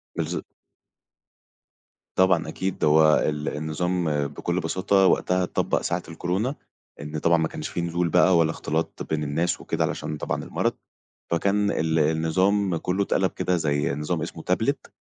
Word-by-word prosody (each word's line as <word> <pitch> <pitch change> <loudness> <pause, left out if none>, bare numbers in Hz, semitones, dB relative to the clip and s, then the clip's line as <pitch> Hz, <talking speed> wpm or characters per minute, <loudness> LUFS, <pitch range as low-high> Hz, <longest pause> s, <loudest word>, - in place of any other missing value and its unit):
بالض - - -2 1.7
طبعًا 95 -3 +3
أكيد، 95 0 -3
هو 75 0 +6
ال 75 0 -1
النظام 80 -1 -1
بكل 85 +5 -2
بساطة 95 +3 +2
وقتها 90 0 +2
اتطبق 90 - 0
ساعة 85 0 -2
الكورونا، 95 - -2 0.5
إن 75 +1 -5
طبعًا 85 +2 +3
ما 80 -1 +1
كانش - - -6
في 85 - -3
نزول 85 0 -1
بقى 90 +1 +5
ولا 80 -1 +3
اختلاط 80 0 -3
بين 80 -1 -1
الناس 80 +4 -1
وكده - - -1
علشان 75 - -3
طبعًا - - -3
المرض، - - -1 0.6
فكان 100 +4 +2
ال 80 0 0
النظام 85 +5 +2
كلّه 90 +4 0
اتقلب 95 -1 +1
كده 90 -1 0
زي 75 -3 0
نظام 75 +3 -2
إسمه 80 0 -6
تابلت - - -1
85 Hz, 145 wpm, -25 LUFS, 80-90 Hz, 1.7 s, هو